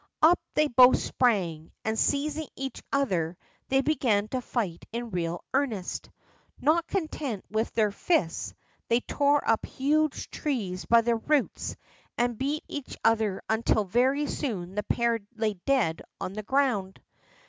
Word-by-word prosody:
Up 340 +3 +7 0.2
they 305 0 +4
both 255 -1 +7
sprang, 180 -10 0
and 220 0 0
seizing 295 +2 0
each 270 0 -5
other, 180 -12 0 0.3
they 270 0 +4
began 245 -8 +1
to 255 +1 -2
fight 210 -9 -3
in 235 0 -4
real 170 -1 -2
earnest. 245 -9 -1 0.5
Not 320 +3 +2
content 305 - -3
with 220 +1 +1
using - - -24
their 215 -2 +3
fists, 165 - 0 0.3
they 235 +1 +3
tore 285 +2 +1
up 225 - +3
huge 300 +2 0
trees 210 - -3
by 235 0 +6
the 230 0 +1
roots, 290 +4 0 0.4
and 240 0 +1
beat 280 +6 -2
each 290 -3 -6
other 220 -4 +2
until 220 -1 +2
very 260 +9 +2
soon 190 -12 -3
the 210 - -1
pair 235 +2 +1 0.2
lay 220 -1 0
dead 245 -13 +2 0.2
on 185 - -4
the 215 - -4
ground. 215 -6 0
235 Hz, 150 wpm, -28 LUFS, 205-280 Hz, 0.5 s, Up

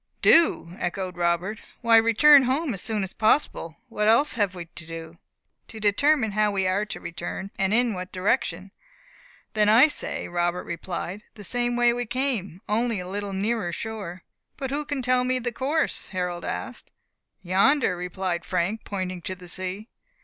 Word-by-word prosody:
"Do!" 315 - +4
echoed 180 0 -3
Robert, 175 +4 0 0.2
"why 230 -1 +5
return 230 +6 +7
home 265 +2 0
as 190 - -5
soon 215 -3 -1
as 190 - -6
possible. 215 - +1
What 210 -3 -1
else 235 +7 +4
have 205 -5 0
we 175 -1 -6
to 165 -1 -12
do?" 165 0 -8 0.5
"To 220 - -9
determine 220 +3 +3
how 210 +1 +2
we 195 -2 0
are 190 +3 +1
to - - -6
return 175 +3 -6
and 190 0 +2
in 235 +1 +2
what 185 -1 -6
direction." 185 -1 -1 0.8
"Then 210 -1 +3
I 235 +7 +7
say," - - -3
Robert 175 +1 -1
replied, 180 +3 -5
"the 210 - -10
same 240 +4 0
way 240 0 +4
that - - -2
we 245 - -3
came, 235 - -2
only 225 0 0
a 180 - -6
little 200 +1 -4
nearer 200 -1 -1
shore." 195 -2 -6 0.3
"But 270 -1 -4
who 295 +2 -2
can 285 -3 -3
tell 250 0 +3
me 255 0 +1
the 240 -1 -2
course?" 285 +7 -1
Harold 180 -2 -3
asked. - - -5 0.5
"Yonder," 195 +6 +3
replied 180 0 -3
Frank, 185 +5 -1
pointing 185 -3 -4
to 185 +2 -5
the 180 -1 -13
sea. 185 +4 -4
205 Hz, 175 wpm, -25 LUFS, 180-240 Hz, 0.8 s, return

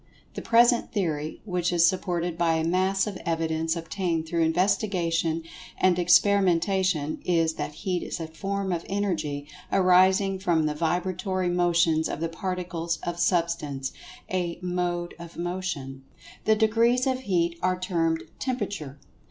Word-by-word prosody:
The - - -5
present 235 +1 +4
theory, 155 -7 -2
which 180 -3 -1
is 170 -1 +4
supported 175 -1 0
by 165 -1 +2
a 160 - 0
mass 185 +3 +1
of 205 -3 -5
evidence 160 0 -1
obtained 165 0 -2
through 170 +1 0
investigation 170 -2 +1 0.3
and 180 -1 +3
experimentation, 180 -3 +3
is 165 -2 +2
that 150 - -5
Heat 180 -2 0
is - - -5
a 165 - -3
form 195 +4 -3
of 170 -1 -2
Energy, 170 -8 -2 0.3
arising 190 +1 +4
from 170 -4 +1
the 150 - 0
vibratory 180 +3 -1
motions 170 -2 +2
of - - -4
the 165 0 -2
Particles 175 -2 -3
of 175 0 -4
Substance—a 170 +1 -2
"Mode 175 -1 -2
of 170 -1 -10
Motion." 170 -7 -4 0.4
The 220 - +4
degrees 230 +4 +3
of 260 -1 0
Heat 170 -7 0
are 185 0 +1
termed 165 -3 0 0.2
"Temperature." 200 - -3
175 Hz, 135 wpm, -26 LUFS, 165-190 Hz, 0.4 s, present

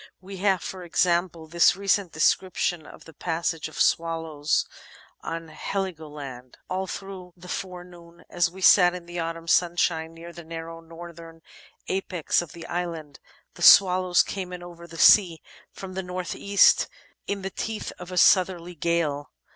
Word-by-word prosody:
We 190 +1 -10
have, 190 -2 +1
for 185 -1 -7
example, 170 -1 0
this 170 +2 +4
recent 195 -2 0
description 175 0 0
of - - -14
the 160 - -14
passage 165 0 -3
of 155 - -13
swaUows 165 -3 0 0.6
on 165 0 -6
Heligoland: 150 -8 -6
'"All 190 +1 -2
through 185 -2 -8
the 180 +1 -13
forenoon, 175 -2 -8
as 175 -1 +1
we 190 +2 -12
sat 180 -1 +6
in 180 -1 -8
the 175 0 -6
autumn 165 0 -5
sunshine 170 -1 +1
near 170 +1 -11
the 170 - -10
narrow 165 0 -8
northern 165 0 -12 0.4
apex 185 -4 -1
of 170 -2 -10
the 170 -1 -10
island, 165 -5 -5 0.3
the - - -14
swallows 185 -2 +6
came 185 -2 -6
in 180 -1 -7
over 170 -1 -11
the 165 - -11
sea 175 -3 +6 0.3
from 190 -1 -9
the 190 - -3
north 180 0 -5
east 200 0 +4 0.4
in 200 -1 -3
the 195 - -4
teeth 220 +2 -5
of 180 0 -9
a 180 - -5
southerly 180 -1 +3
gale. 160 -3 -1
175 Hz, 155 wpm, -25 LUFS, 165-185 Hz, 0.6 s, sat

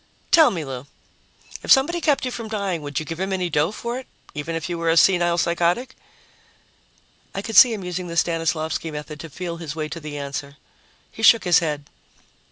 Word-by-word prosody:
"Tell 320 -2 +7
me, 165 -5 -4
Lou. 135 0 -7 0.7
If - - -2
somebody 335 +6 +4
kept 290 -4 +2
you 255 - -2
from 230 -2 -6
dying, 200 -6 -2
would 145 -1 -3
you 155 - -6
give 165 +1 -6
him 190 +1 -2
any 180 -2 -1
dough 150 +4 +2
for 235 +3 -4
it, 265 - -12 0.3
even 150 +3 -4
if 165 - -3
you 175 -1 -4
were 165 0 0
a 165 - +3
senile 175 -1 +4
psychotic?" 175 +9 0 1.4
I 195 - -3
could 225 - -5
see 250 - +9
him 210 -4 -4
using 180 0 -4
the 170 0 -6
Stanislavsky 165 -1 0
method 150 0 -7
to 165 - -8
feel 170 +2 -6
his 160 -3 -6
way 155 -1 -3
to 170 - -6
the 150 -2 -7
answer. 140 0 -6 0.5
He - - -10
shook 225 0 +6
his 180 -3 +5
head. 150 -4 -3
170 Hz, 205 wpm, -22 LUFS, 155-200 Hz, 1.4 s, see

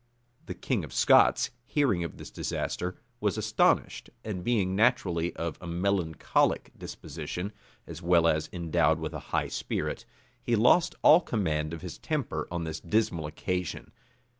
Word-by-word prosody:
The - - -5
king 120 -9 -1
of 70 -5 -8
Scots, - - +5
hearing 120 - +1
of 85 - -6
this - - -10
disaster, 90 +1 -3 0.2
was - - 0
astonished; - - +1 0.2
and 95 -5 -4
being 100 -5 +1
naturally 95 -7 +2
of 85 -1 -4
a 90 - -7
melancholic 85 -2 0
disposition, 85 +7 -6 0.3
as 85 0 -9
well 85 -1 +4
as 80 -1 +1
endowed 80 -2 +1
with 80 0 -4
a 75 - -4
high - - 0
spirit, - - -3 0.4
he 120 - +1
lost 165 +10 +4
all 165 +4 +8
command 80 - -1
of 85 +1 -7
his 90 - -7
temper 135 - -2
on 85 -1 -3
this 80 -1 -4
dismal 85 -4 0
occasion. 90 +4 -4
85 Hz, 150 wpm, -28 LUFS, 80-105 Hz, 0.4 s, all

